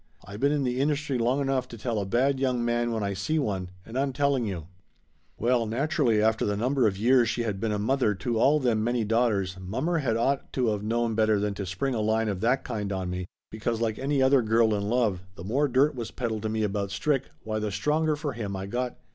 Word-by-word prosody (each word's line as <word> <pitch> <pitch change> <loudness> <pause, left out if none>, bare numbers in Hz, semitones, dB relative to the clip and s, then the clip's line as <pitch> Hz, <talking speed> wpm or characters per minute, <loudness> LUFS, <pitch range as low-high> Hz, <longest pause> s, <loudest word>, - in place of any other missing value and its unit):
I 100 - -9
been 140 +7 +2
in 145 -2 +1
the 125 0 -1
industry 145 -2 0
long 125 +4 +1
enough 135 -2 0
to 115 - -10
tell 115 -1 -2
a 100 - -3
bad 130 +6 +2
young 125 -3 0
man 120 0 0
when 110 -2 -1
I 100 0 -1
see 100 +12 -1
one, 95 -10 -1 0.2
and 120 +3 -4
I'm 135 -1 0
telling 140 -2 +1
you 85 -6 -4 0.4
!" - - -42 0.3
Well 120 0 +1
naturally, 135 - +1
after 110 +1 +2
the 105 -1 0
number 125 +2 +2
of 95 -2 -1
years 120 +2 +4
she 120 - -1
had 105 -4 -2
been 110 +1 -1
a 105 - 0
mother 110 0 +1
to 115 +3 -2
all 145 +5 +4
them 115 -5 +1
many 120 0 0
daughters, 105 -4 +1
mommer 155 - -1
had 115 -6 0
ought 135 +4 0
to 125 -4 +1
of 105 -1 -2
known 115 +2 0
better 110 -1 +3
than 105 0 -1
to 100 -1 -5
spring 110 +9 -2
a 110 - -1
line 110 +1 +1
of 95 -2 -3
that 125 +4 +2
kind 105 -4 -3
on 95 -2 -2
me, 90 0 -4 0.2
because 110 +1 -2
like 110 -2 -1
any 135 0 +1
other 130 0 +5
girl 110 0 +3
in 100 0 -1
love, 110 -7 +1
the 85 - -9
more 135 +10 +1
dirt 140 +4 +3
was 120 -4 -5
peddled 115 -4 -3
to 110 - -2
me 110 0 -1
about 100 -1 -1
Strick, 135 +7 -1
why 110 0 -2
the 105 0 -2
stronger 150 +10 +1
for 145 -2 -4
him 105 -4 -4
I 95 0 -4
got. 120 +4 -3
115 Hz, 250 wpm, -27 LUFS, 105-130 Hz, 0.4 s, other